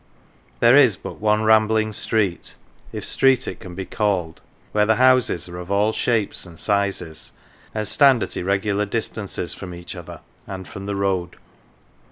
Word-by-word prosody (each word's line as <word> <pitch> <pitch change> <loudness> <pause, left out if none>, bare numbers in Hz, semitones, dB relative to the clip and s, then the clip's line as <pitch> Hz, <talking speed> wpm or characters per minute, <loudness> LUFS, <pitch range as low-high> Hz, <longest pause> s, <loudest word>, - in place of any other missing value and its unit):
There 120 +2 +6
is 125 -9 +6
but - - -9
one 105 0 +2
rambling 110 0 +3
street, 100 -4 -1 0.4
if - - -5
street 135 -1 +3
it - - -6
can 90 -2 -10
be 95 0 -5
called, 95 -7 -2 0.3
where 105 0 +2
the 110 - +4
houses 130 -9 +3
are 90 0 -8
of 90 0 -9
all 105 +2 +2
shapes 110 -4 0
and 85 -3 -13
sizes, 100 -6 -1 0.4
and 110 -1 -2
stand 135 -5 +4
at - - -6
irregular 100 +2 -1
distances 100 -4 -3
from 90 -2 -8
each 85 0 -9
other - - -10 0.3
and 95 -1 -7
from 100 0 -8
the 100 - -2
road. 95 -3 -1
100 Hz, 165 wpm, -22 LUFS, 95-110 Hz, 0.4 s, There